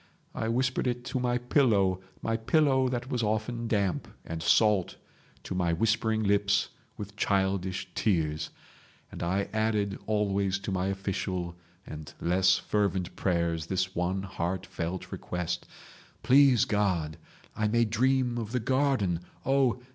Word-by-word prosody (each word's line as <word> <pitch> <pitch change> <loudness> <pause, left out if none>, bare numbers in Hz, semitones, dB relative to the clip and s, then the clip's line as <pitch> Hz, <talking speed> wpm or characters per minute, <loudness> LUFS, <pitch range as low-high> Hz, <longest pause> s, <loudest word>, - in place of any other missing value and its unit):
I 110 - -2
whispered 130 +3 0
it 120 0 -2
to 130 - -2
my 125 0 +1
pillow—my 110 -5 +1
pillow 130 +2 +3
that 125 +1 -3
was 125 - 0
often 110 +2 -1
damp 100 -4 0 0.2
and 80 0 -5
salt 105 0 +3 0.5
to - - -5
my 90 -2 +1
whispering 110 +3 +1
lips 100 0 +2 0.3
with 105 0 -7
childish 95 -2 0
tears. 80 -6 0 0.6
And - - -8
I 95 +4 0
added 110 -2 0
always 100 -2 +1
to 100 0 -5
my 95 0 0
official 95 -3 -3 0.3
and 75 -1 -8
less 95 +2 +3
fervent 100 -4 -1
prayers 85 -3 0
this 95 +1 -1
one 90 +2 -1
heartfelt 90 -1 -4
request: 90 0 -4 0.6
'Please 135 -3 +6
God 90 -7 0 0.4
I 110 0 +1
may 115 +2 +3
dream 125 +2 +1
of 115 0 -5
the 125 - +2
garden. 130 -8 +1 0.3
Oh! 130 -2 +2
100 Hz, 130 wpm, -29 LUFS, 95-120 Hz, 0.6 s, Please